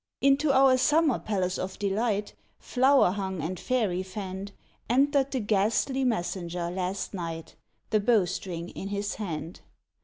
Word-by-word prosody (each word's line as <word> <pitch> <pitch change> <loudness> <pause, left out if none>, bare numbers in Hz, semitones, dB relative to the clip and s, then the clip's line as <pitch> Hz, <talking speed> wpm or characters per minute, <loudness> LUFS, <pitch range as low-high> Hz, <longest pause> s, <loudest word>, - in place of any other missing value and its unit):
Into 275 +2 +3
our 265 -1 +5
summer 300 -1 +3
palace 185 -3 -1
of 185 0 -4
delight, 205 +1 -1 0.2
Flower 265 -6 +3
hung 190 -2 -3
and 170 +3 -3
fairy 215 -8 0
fanned, 190 +1 -6 0.4
Entered 275 +2 +3
the 265 - -2
ghastly 220 +6 +1
messenger 175 -6 -2
last 185 +2 -3
night, 165 -3 -6 0.4
The 215 - +4
bow 215 -2 +3
string 175 -1 -5
in 195 - -7
his 200 0 -2
hand. 165 -3 -5
200 Hz, 140 wpm, -27 LUFS, 185-255 Hz, 0.4 s, our